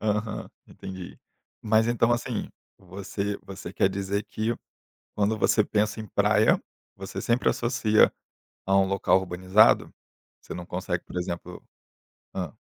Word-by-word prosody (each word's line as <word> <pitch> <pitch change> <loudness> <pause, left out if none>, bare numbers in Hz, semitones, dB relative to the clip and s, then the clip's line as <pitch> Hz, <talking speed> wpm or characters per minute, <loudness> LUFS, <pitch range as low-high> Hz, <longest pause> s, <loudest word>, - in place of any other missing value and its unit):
Aham. 105 0 -2 0.2
Entendi. 95 -2 -9 0.4
Mas 110 +1 +3
então 120 0 +3
assim, 120 - -2 0.3
você 100 +2 -4
você 95 -2 -8
quer 95 - +3
dizer 100 +1 -2
que 110 +2 -1 0.6
quando 105 +1 +1
você 110 -1 +3
pensa 105 +1 0
em 110 - -7
praia, - - +3 0.4
você 95 0 -6
sempre 120 +1 +1
associa 115 -3 +3 0.5
a 95 0 +3
um 95 - +4
local 95 0 +3
urbanizado? 95 +4 +3 0.5
Você - - -8
não 90 -1 -7
consegue, 90 -1 -3
por - - -10
exemplo 90 0 -4 0.7
hã. 90 -6 -4
100 Hz, 130 wpm, -26 LUFS, 95-110 Hz, 0.7 s, um